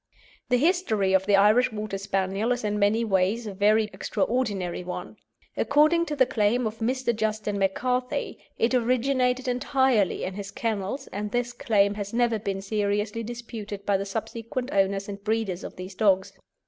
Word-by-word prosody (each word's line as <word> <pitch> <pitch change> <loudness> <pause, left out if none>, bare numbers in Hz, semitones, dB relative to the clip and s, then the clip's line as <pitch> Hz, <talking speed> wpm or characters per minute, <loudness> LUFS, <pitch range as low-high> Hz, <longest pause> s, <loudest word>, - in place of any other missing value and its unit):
The 250 - +4
history 245 - +2
of 190 0 +3
the 205 - +5
Irish 210 +5 +5
Water 210 -2 -4
Spaniel 195 +3 -1
is 245 -1 -1
in 210 0 -1
many 215 +3 +2
ways 200 +3 +1
a 205 - -5
very 210 +3 +3
extraordinary 195 -3 -1
one. 180 +3 -6 0.4
According 310 +4 +3
to 300 - -2
the 260 - +4
claim 230 +2 +1
of 220 +1 -4
Mr. 245 +1 0
Justin 215 -2 -1
McCarthy, 250 +6 -1 0.2
it 230 +3 +1
originated 255 +1 +1
entirely 250 -4 +1
in 185 - -3
his 200 0 -6
kennels, 220 +5 -3
and 210 +2 -3
this 245 +2 -1
claim 205 -4 +2
has 205 0 -6
never 235 -2 +2
been 195 -2 -3
seriously 205 +2 -1
disputed 225 -3 -7
by 200 - +2
the 195 +1 -1
subsequent 230 +5 -4
owners 195 0 +1
and 200 -1 -7
breeders 215 -4 -1
of - - -8
these 185 +1 -8
dogs. 190 -1 +2
215 Hz, 165 wpm, -26 LUFS, 200-245 Hz, 0.4 s, the